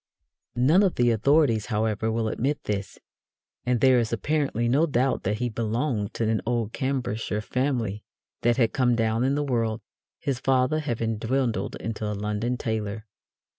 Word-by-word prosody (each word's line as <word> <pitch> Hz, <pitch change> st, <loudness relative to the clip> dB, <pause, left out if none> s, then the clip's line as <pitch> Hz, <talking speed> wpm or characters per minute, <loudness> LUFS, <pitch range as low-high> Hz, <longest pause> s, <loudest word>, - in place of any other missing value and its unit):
None 145 Hz, +10 st, +4 dB
of 195 Hz, -3 st, +2 dB
the 120 Hz, -1 st, +3 dB
authorities, 115 Hz, -1 st, +3 dB
however, 110 Hz, 0 st, 0 dB
will 110 Hz, 0 st, 0 dB
admit 135 Hz, +6 st, -1 dB
this, 100 Hz, -2 st, -3 dB, 0.7 s
and 125 Hz, -2 st, +1 dB
there 130 Hz, -2 st, +6 dB
is 115 Hz, -2 st, -1 dB
apparently 135 Hz, -1 st, 0 dB
no 145 Hz, +7 st, +3 dB
doubt 130 Hz, -2 st, +1 dB
that 105 Hz, +2 st, -1 dB
he 125 Hz, +2 st, -1 dB
belonged 115 Hz, -1 st, -2 dB
to 115 Hz, -, 0 dB
an 110 Hz, -1 st, +1 dB
old 115 Hz, -2 st, -1 dB
Cambridgeshire 120 Hz, -6 st, -2 dB
family 120 Hz, -4 st, -1 dB, 0.4 s
that 120 Hz, 0 st, +2 dB
had 115 Hz, -4 st, +2 dB
come 125 Hz, -2 st, +2 dB
down 115 Hz, 0 st, +1 dB
in 135 Hz, +2 st, +2 dB
the 145 Hz, -, 0 dB
world, 115 Hz, -5 st, 0 dB, 0.4 s
his 140 Hz, -5 st, -2 dB
father 130 Hz, +3 st, +2 dB
having 115 Hz, -6 st, -2 dB
dwindled 120 Hz, 0 st, -1 dB
into 110 Hz, -1 st, -4 dB
a 105 Hz, -, -4 dB
London 105 Hz, +4 st, -2 dB
tailor. 110 Hz, -2 st, -3 dB
120 Hz, 165 wpm, -26 LUFS, 110-130 Hz, 0.7 s, there